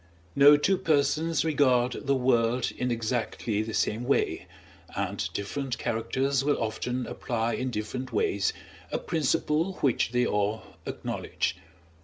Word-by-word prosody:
No 145 +1 +8
two 190 +6 +2
persons 160 +1 +1
regard 130 -4 +2
the 140 - +3
world 125 -1 +2
in 125 - -1
exactly 115 -2 -1
the 110 0 -4
same 110 +3 0
way, 140 - 0 0.5
and - - -2
different 125 +5 -3
characters 130 +4 0
will 145 +1 +2
often 120 +3 -2
apply 115 -1 -2
in 130 - -2
different 125 +3 -4
ways 100 -2 +1 0.4
a - - 0
principle 160 +3 0
which 130 -5 +2
they 125 0 +2
all 105 0 0 0.2
acknowledge. - - -2
125 Hz, 130 wpm, -28 LUFS, 115-140 Hz, 0.5 s, No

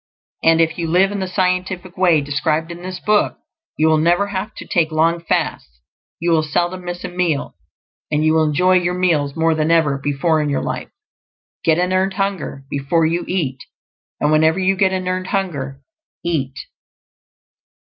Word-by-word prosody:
And 165 0 +4
if 165 +1 +1
you 165 - -1
live 185 +4 +3
in 205 - -3
the 190 - -2
scientific 185 -1 -1
way 175 -5 +3
described 155 +3 -1
in 170 0 -8
this 185 0 -6
book, 210 -1 +1 0.4
you 155 - +3
will 155 -1 +4
never 175 +5 +2
have 200 +2 -3
to - - -9
take 165 -2 +1
long 165 +2 +2
fasts; 65 - -2 0.4
you 170 +1 0
will 160 -1 +4
seldom 175 +4 -1
miss 175 0 -5
a - - -3
meal, 175 -5 -1 0.6
and 150 +1 +1
you 155 - +4
will 160 -1 +3
enjoy 180 +5 +3
your 175 0 -1
meals 155 -6 +1
more 165 0 +2
than 155 0 0
ever 155 -4 +3
before 145 +3 +1
in 150 - -1
your 140 - -1
life. - - -4 0.7
Get 160 -1 +3
an 180 +1 +1
earned 190 +1 +1
hunger 195 -8 -3
before 140 +4 0
you 170 +2 0
eat; 145 -8 -2 0.6
and 150 - +1
whenever 160 +2 +4
you 190 0 +2
get 190 -1 +2
an 185 -1 -2
earned 185 0 -2
hunger, 140 -9 -3 0.4
eat. 135 -6 -1
170 Hz, 180 wpm, -19 LUFS, 155-185 Hz, 0.7 s, And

